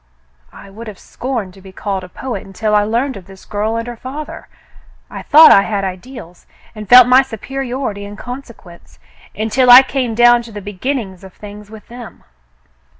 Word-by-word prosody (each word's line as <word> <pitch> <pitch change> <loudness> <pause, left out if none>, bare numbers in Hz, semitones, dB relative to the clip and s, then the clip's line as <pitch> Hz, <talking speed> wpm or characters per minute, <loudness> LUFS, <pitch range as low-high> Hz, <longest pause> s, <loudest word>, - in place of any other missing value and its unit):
I 195 - -14
would 225 +3 -11
have 210 -3 -9
scorned 235 -8 -6
to 195 - -17
be 190 0 -14
called 195 0 -5
a 180 - -11
poet 240 -1 -6
until 210 +3 -4
I 210 0 +3
learned 235 +4 -2
of 185 -2 -14
this 195 -1 -15
girl 215 +2 -3
and 230 0 -3
her 240 - -7
father. 275 +6 -9 0.6
I - - -7
thought 315 +2 +7
I 195 - +7
had 200 -1 -3
ideals, 185 -1 -9 0.3
and 215 -3 -10
felt 250 0 +9
my 255 +2 +5
superiority 260 -3 -6
in 205 0 -10
consequence, 235 -7 -12 0.4
until 220 +5 0
I 250 +2 +10
came 260 -4 -3
down 240 +1 +5
to 235 -1 -13
the 210 - -8
beginnings 205 -1 -5
of 190 -1 -13
things 210 0 -12
with 220 -1 -14
them." 240 -1 -12
220 Hz, 185 wpm, -16 LUFS, 200-250 Hz, 0.6 s, I